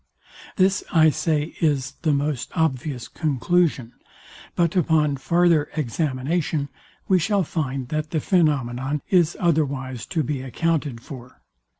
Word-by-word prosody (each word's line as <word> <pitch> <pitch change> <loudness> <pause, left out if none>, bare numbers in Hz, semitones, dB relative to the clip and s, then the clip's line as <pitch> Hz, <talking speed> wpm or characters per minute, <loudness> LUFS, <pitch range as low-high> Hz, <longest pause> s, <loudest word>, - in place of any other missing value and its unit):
This 190 0 +2
I 160 -2 +5
say 155 0 -1
is 140 -4 +1
the 160 -3 +2
most 145 -2 -1
obvious 140 -5 -1
conclusion; 150 -3 0 0.6
but 170 0 +1
upon 155 -5 +2
farther 170 +1 +2
examination 145 +2 -1 0.4
we 185 -1 +4
shall 200 +3 +1
find 135 -6 -3
that 155 0 -2
the 160 - -2
phænomenon 145 -5 +1
is 175 -4 +3
otherwise 140 -7 -1
to 160 -4 -1
be 140 -1 -3
accounted 145 -2 -1
for. 125 -1 -11
150 Hz, 120 wpm, -23 LUFS, 135-165 Hz, 0.6 s, I